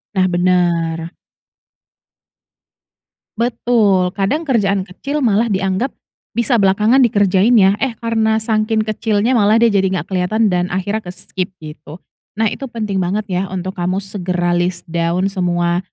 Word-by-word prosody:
Nah 185 Hz, -1 st, +3 dB
bener. 170 Hz, -2 st, 0 dB, 2.2 s
Betul 220 Hz, -6 st, +1 dB
kadang 285 Hz, +12 st, -1 dB
kerjaan 200 Hz, -6 st, +1 dB
kecil 280 Hz, +11 st, -4 dB
malah 230 Hz, -3 st, +1 dB
dianggap 195 Hz, +6 st, -1 dB, 0.4 s
bisa 235 Hz, +1 st, 0 dB
belakangan 210 Hz, +5 st, +3 dB
dikerjain 205 Hz, -2 st, +3 dB
ya, 195 Hz, 0 st, +4 dB
eh 265 Hz, -, 0 dB
karena 220 Hz, -1 st, +1 dB
saking 220 Hz, 0 st, 0 dB
kecilnya 215 Hz, +2 st, 0 dB
malah 210 Hz, 0 st, +4 dB
dia 235 Hz, -, +5 dB
jadi 195 Hz, -1 st, +2 dB
gak 155 Hz, -, -8 dB
kelihatan 195 Hz, +4 st, +1 dB
dan 180 Hz, 0 st, -1 dB
akhirnya 200 Hz, +4 st, -2 dB
ke-skip 185 Hz, +1 st, -6 dB
gitu 155 Hz, +2 st, -10 dB, 0.4 s
nah 220 Hz, 0 st, +1 dB
itu 270 Hz, -, -6 dB
penting 215 Hz, -5 st, -3 dB
banget 190 Hz, +4 st, -1 dB
ya 180 Hz, +1 st, 0 dB
untuk 185 Hz, 0 st, -5 dB
kamu 185 Hz, +3 st, -1 dB
segera 180 Hz, -3 st, -2 dB
list 175 Hz, 0 st, -1 dB
down 170 Hz, +2 st, 0 dB
semua 175 Hz, -2 st, 0 dB
195 Hz, 135 wpm, -17 LUFS, 180-220 Hz, 2.2 s, dia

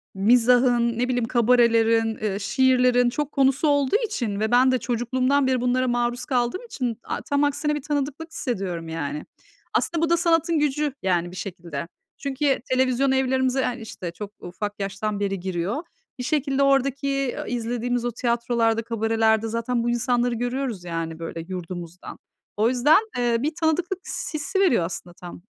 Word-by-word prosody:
mizahın, 240 Hz, +2 st, +3 dB
ne 250 Hz, -, +1 dB
bileyim, 245 Hz, -2 st, 0 dB
kabarelerin, 230 Hz, -1 st, +3 dB
eee, 205 Hz, -2 st, -1 dB
şiirlerin 250 Hz, -1 st, +3 dB
çok 295 Hz, +3 st, -3 dB
konusu 270 Hz, +2 st, +2 dB
olduğu 285 Hz, +3 st, +2 dB
için 235 Hz, -, -3 dB
ve 220 Hz, +2 st, 0 dB
ben 255 Hz, +2 st, +5 dB
de 255 Hz, -, +2 dB
çocukluğumdan 255 Hz, +3 st, +1 dB
beri 255 Hz, -2 st, +1 dB
bunlara 250 Hz, +1 st, +1 dB
maruz 240 Hz, 0 st, -1 dB
kaldığım 250 Hz, -, -1 dB
için 245 Hz, -, -3 dB
a -, -, -4 dB
tam 285 Hz, 0 st, 0 dB
aksine 295 Hz, +1 st, 0 dB
bir 295 Hz, -, -4 dB
tanıdıklık 295 Hz, +3 st, -3 dB
hissediyorum 190 Hz, -, -3 dB
yani. 150 Hz, -2 st, -4 dB, 0.5 s
Aslında 335 Hz, -1 st, 0 dB
bu -, -, -4 dB
da 340 Hz, -, +4 dB
sanatın 330 Hz, -1 st, +2 dB
gücü, 295 Hz, 0 st, 0 dB
yani, 175 Hz, -2 st, 0 dB
bir -, -, -11 dB
şekilde. 175 Hz, -3 st, -6 dB, 0.3 s
Çünkü 280 Hz, -1 st, 0 dB
televizyon 260 Hz, +1 st, +2 dB
evlerimize, 260 Hz, 0 st, +1 dB
hani, 250 Hz, -1 st, -2 dB
işte, 185 Hz, -5 st, -6 dB
çok 200 Hz, +4 st, -8 dB
ufak 205 Hz, +4 st, -6 dB
yaştan 200 Hz, +1 st, -3 dB
beri 195 Hz, -1 st, -1 dB
giriyor. 190 Hz, -, -2 dB, 0.4 s
Bir -, -, -3 dB
şekilde 280 Hz, -1 st, +1 dB
oradaki, 275 Hz, 0 st, +1 dB
ııı, -, -, -5 dB
izlediğimiz 245 Hz, 0 st, -2 dB
o 240 Hz, -, 0 dB
tiyatrolarda, 235 Hz, -1 st, 0 dB
kabarelerde 225 Hz, -1 st, +1 dB
zaten 230 Hz, +1 st, -1 dB
bu 240 Hz, -, 0 dB
insanları 240 Hz, 0 st, +1 dB
görüyoruz, 245 Hz, -4 st, -3 dB
yani, 165 Hz, -2 st, -4 dB
böyle, 165 Hz, 0 st, -6 dB
yurdumuzdan. 180 Hz, -1 st, -7 dB, 0.4 s
O 220 Hz, +2 st, +3 dB
yüzden, 260 Hz, +7 st, +5 dB, 0.2 s
eee, 240 Hz, -1 st, +2 dB
bir 300 Hz, +6 st, -1 dB
tanıdıklık 345 Hz, +3 st, 0 dB
s 310 Hz, -, -4 dB
hissi 300 Hz, +6 st, -2 dB
veriyor 250 Hz, -, +3 dB
aslında 175 Hz, 0 st, -7 dB
tam. 175 Hz, -1 st, -10 dB
245 Hz, 160 wpm, -24 LUFS, 215-270 Hz, 0.5 s, ben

